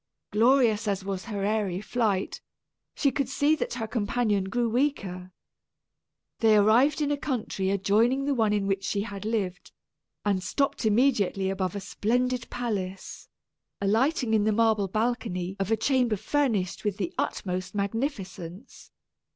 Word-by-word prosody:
Glorious 225 -1 +3
as 195 -1 -1
was 195 -1 -4
her 205 -4 -4
airy 205 -4 0
flight, 210 -3 -1 0.5
she 280 - +2
could 275 -3 -1
see 290 +3 +2
that - - -3
her 225 -3 -3
companion 215 -2 0
grew 235 +4 0
weaker. 200 -8 -1 1.1
They 220 -2 +5
arrived 235 +9 +4
in 290 -1 +1
a 290 - +1
country 235 -9 -2
adjoining 215 +7 +2
the 285 - +1
one 220 -5 +2
in 205 -1 +1
which 195 0 -1
she 200 +1 -1
had 200 -1 -6
lived, 200 -5 -2 0.5
and 200 -2 +1
stopped 230 +4 0
immediately 205 -5 +2
above 190 -1 -2
a - - -2
splendid 245 +5 -1
palace 195 -6 -4 0.5
alighting 225 +5 +1
in 215 -2 +3
the 215 - +2
marble 220 -2 +2
balcony 215 -4 -2
of 195 0 -1
a 225 - +2
chamber 245 -1 +2
furnished 220 -7 0
with 205 -2 -1
the 185 -5 -3
utmost 185 +1 -3
magnificence. 200 - -4
215 Hz, 145 wpm, -27 LUFS, 195-245 Hz, 1.1 s, They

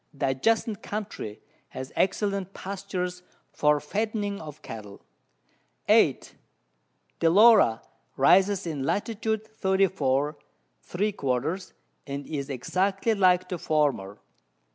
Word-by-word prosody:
The 135 - 0
adjacent 220 - 0
Country 200 - -6 0.3
has 130 0 -8
excellent 195 0 0
Pastures 185 -2 -4 0.3
for 150 0 +2
fattening 205 +4 -2
of 150 -2 -10
Cattle. 105 -3 -9 0.8
8. - - +3 0.9
Delora 170 - +5 0.3
rises 190 +7 +4
in 155 -5 -3
Lat. 140 +9 0 0.2
34 190 -9 0 0.4
three 205 +4 -1
quarters, 145 +3 -2 0.3
and 140 0 -5
is 145 -2 -4
exactly 190 - 0
like 185 -3 +3
the 180 -2 -4
former. 140 -12 0
180 Hz, 100 wpm, -26 LUFS, 140-200 Hz, 0.9 s, Delora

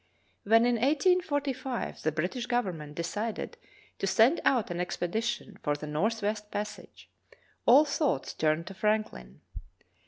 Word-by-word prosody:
When 225 +3 +5
in 240 -1 +2
1845 285 -4 0
the 155 - +1
British 180 - -2
Government 180 -12 -2
decided 205 +7 -3 0.4
to 195 - -1
send 225 - +4
out 240 -8 +2
an 175 - -3
expedition 215 +4 -3
for 145 -1 0
the 145 - -7
northwest 210 +6 -1
passage, 210 0 -6 0.6
all 275 +6 +8
thoughts 280 - -1
turned 155 +1 +1
to 195 - -8
Franklin. 190 - -2
215 Hz, 125 wpm, -29 LUFS, 170-245 Hz, 0.6 s, all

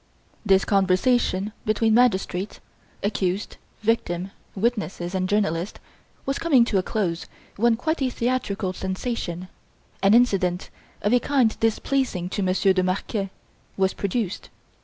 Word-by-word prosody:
This 195 -3 +4
conversation 200 +1 +2
between 215 +1 +2
magistrates, 210 -5 +2 0.4
accused, 200 -1 -1 0.2
victim, 195 -4 0 0.2
witnesses 195 -5 -1
and 185 -1 -1
journalist, 190 -3 0 0.5
was 275 +1 -1
coming 275 -8 +4
to 205 -4 +1
a - - +2
close 180 -4 -2 0.3
when 235 +2 +3
quite 315 +7 -2
a 260 - +2
theatrical 230 -7 -1
sensation 185 -2 -3 0.5
an 200 +3 +5
incident 195 -7 +2 0.3
of 205 +4 +2
a 245 - +6
kind 255 -3 +2
displeasing 225 -4 0
to 200 - -2
Monsieur 190 +1 +3
de 185 - +2
Marquet 195 +2 -1 0.5
was 190 0 +2
produced. 200 -1 -3
200 Hz, 125 wpm, -24 LUFS, 185-235 Hz, 0.5 s, a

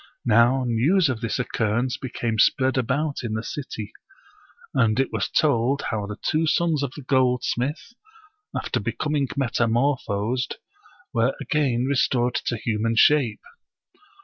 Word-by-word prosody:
Now 120 +3 +4
news 140 +9 +2
of 115 -3 -3
this 115 -2 -2
occurrence 120 0 -1
became 120 -4 -3
spread 130 +4 +3
about 140 +4 -1
in 115 -3 -4
the 110 - -3
city, 115 -7 -6 0.8
and 115 +1 +2
it 135 - 0
was - - -1
told 140 -3 +2
how 105 -2 -2
the 105 0 -6
two 160 +1 +1
sons 160 -1 +1
of 140 -3 -2
the 145 - -9
gold 130 -2 +2
smith, 145 - -3 0.7
after - - -2
becoming 150 -3 -1
metamorphosed, 120 -2 0 0.6
were 115 +3 +1
again 130 -5 0
restored 125 -3 +1
to 120 - 0
human 115 +1 -1
shape. 130 -1 +4
125 Hz, 135 wpm, -24 LUFS, 115-140 Hz, 0.8 s, Now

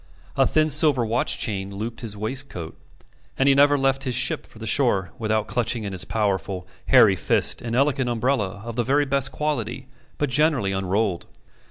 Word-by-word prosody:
A - - +3
thin 155 0 +2
silver 145 -4 +4
watch 115 +2 +1
chain 100 -2 -2
looped 115 +4 -6
his 105 -3 -4
waistcoat, 110 -6 -5 0.6
and 135 - +2
he 140 - +6
never 145 +1 +4
left 135 0 +1
his 125 -3 -2
ship 125 - +1
for - - -18
the 110 - -8
shore 105 -6 +1
without 110 -1 -1
clutching 120 0 -2
in 100 - -5
his 95 0 -2
powerful, 95 -4 -2 0.2
hairy - - +6
fist - - +2
an 115 -1 -4
elegant 135 -1 +1
umbrella 115 -5 -1
of 115 -1 -6
the 120 - 0
very 145 +4 +1
best 135 0 0
quality, 125 -7 -3 0.3
but 145 -3 -2
generally 140 -7 +2
unrolled. 95 0 -1
120 Hz, 180 wpm, -23 LUFS, 105-135 Hz, 0.6 s, he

